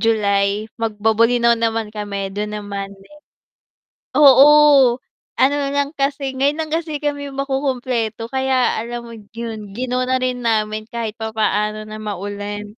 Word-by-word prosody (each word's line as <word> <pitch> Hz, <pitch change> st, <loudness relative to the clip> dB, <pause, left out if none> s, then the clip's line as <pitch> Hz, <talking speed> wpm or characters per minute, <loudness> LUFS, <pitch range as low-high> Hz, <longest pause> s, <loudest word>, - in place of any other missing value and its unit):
July, 205 Hz, -2 st, +1 dB, 0.2 s
magbo-Bolinao 230 Hz, +2 st, +2 dB
naman 225 Hz, -2 st, -2 dB
kami, 200 Hz, -2 st, -4 dB
do'n 210 Hz, +1 st, -3 dB
naman 200 Hz, -1 st, -5 dB
next. 300 Hz, +11 st, -19 dB, 1.0 s
Oo, 280 Hz, -2 st, +7 dB, 0.4 s
ano 265 Hz, +2 st, +4 dB, 0.2 s
lang 285 Hz, 0 st, 0 dB
kasi, 275 Hz, -1 st, -1 dB
ngayon 285 Hz, +4 st, +1 dB
lang 310 Hz, -, -6 dB
kasi 315 Hz, -3 st, -3 dB
kami 285 Hz, -1 st, -3 dB
makukumpleto 255 Hz, -5 st, -2 dB
kaya 265 Hz, -1 st, +1 dB
alam 235 Hz, +1 st, -5 dB
mo -, -, -9 dB, 0.2 s
'yun, 220 Hz, -3 st, -7 dB
gi-no 250 Hz, +2 st, -2 dB
na 260 Hz, 0 st, +1 dB
rin 250 Hz, -1 st, -2 dB
namin 215 Hz, -1 st, 0 dB
kahit 230 Hz, -1 st, -5 dB
papaano 215 Hz, -1 st, -1 dB
na 215 Hz, 0 st, -8 dB
maulan. 205 Hz, +1 st, -6 dB
230 Hz, 130 wpm, -19 LUFS, 210-265 Hz, 1.0 s, Oo